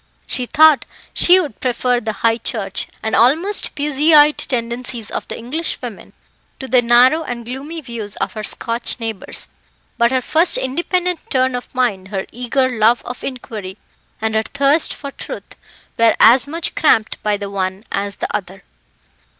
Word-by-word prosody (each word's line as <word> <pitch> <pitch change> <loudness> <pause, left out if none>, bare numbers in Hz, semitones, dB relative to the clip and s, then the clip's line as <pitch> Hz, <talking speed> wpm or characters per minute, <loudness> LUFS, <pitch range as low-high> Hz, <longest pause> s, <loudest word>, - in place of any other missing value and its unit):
She 250 -2 -3
thought 315 0 +5 0.3
she 360 +1 +5
would 295 - -4
prefer 250 -1 0
the 220 -1 -3
High 230 0 +3
Church, 200 -7 -4 0.2
and 220 - 0
almost 325 - +2
Puseyite, 295 +1 +4
tendencies 235 -2 -3
of - - -4
the - - -5
English 285 +9 -3
women - - -9 0.5
to 265 - -6
the 255 -1 +4
narrow 245 +6 +5
and 240 -6 -6
gloomy 280 +7 -6
views 230 -6 -3
of - - -3
her 215 - -5
Scotch 230 +3 -2
neighbours; 225 -3 -5 0.5
but 235 0 +4
her 255 0 0 0.4
independent 350 +6 -1
turn 260 -1 +1
of 245 0 -6
mind, 205 -7 0
her 195 -1 -4
eager 250 +2 0
love 235 -1 +2
of 245 +1 -7
inquiry 215 -7 -6 0.4
and 220 0 -1
her 220 - +2
thirst 280 +6 +2
for 280 -1 -6
truth, - - -9 0.4
were 230 -1 +5
as 245 +4 +6
much 325 +3 -3
cramped 220 -8 +2
by 210 -1 0
the 200 -1 -6
one 190 0 -3
as 200 0 -2
the - - -3
other. 190 +1 -6
245 Hz, 160 wpm, -18 LUFS, 220-280 Hz, 0.5 s, as